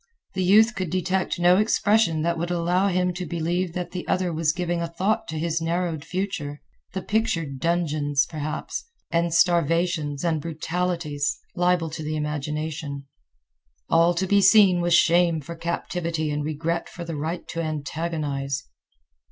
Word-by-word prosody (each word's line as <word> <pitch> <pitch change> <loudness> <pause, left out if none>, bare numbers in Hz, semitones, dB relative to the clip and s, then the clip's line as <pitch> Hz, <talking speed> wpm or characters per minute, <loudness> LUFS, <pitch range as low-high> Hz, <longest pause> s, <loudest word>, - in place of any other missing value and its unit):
The 190 - -1
youth 215 +5 +6
could 185 -6 -3
detect 185 +1 0
no 175 +1 +5
expression 210 -5 +2
that 170 0 +1
would 170 +1 -3
allow 175 +2 +1
him 180 -1 +1
to 180 +1 -4
believe 170 +2 -2
that 180 0 -4
the 180 -1 -5
other 185 -2 0
was 155 -1 +2
giving 175 0 -2
a 170 - -1
thought 205 +7 -1
to 160 -1 -4
his 165 +1 -1
narrowed 165 -2 -1
future, 170 -7 -3 0.3
the 190 -1 -3
pictured 165 -11 -1
dungeons, 150 -4 +1
perhaps, 155 -1 -4 0.3
and 170 0 +1
starvations 165 -3 +2
and 160 -3 +1
brutalities, 165 -2 -2 0.2
liable 175 -2 +1
to 160 - -6
the 155 0 -3
imagination. 150 -1 -3 0.8
All 170 +1 +4
to 185 +3 0
be 200 +2 +4
seen 195 -4 +6
was 175 0 +3
shame 170 -1 +4
for 170 +3 -8
captivity 165 -1 -2
and 145 0 -2
regret 160 +3 -2
for 175 - -8
the 165 -1 -4
right 160 +4 -4
to 165 - -3
antagonize. 150 -3 -3
170 Hz, 155 wpm, -24 LUFS, 155-180 Hz, 0.8 s, youth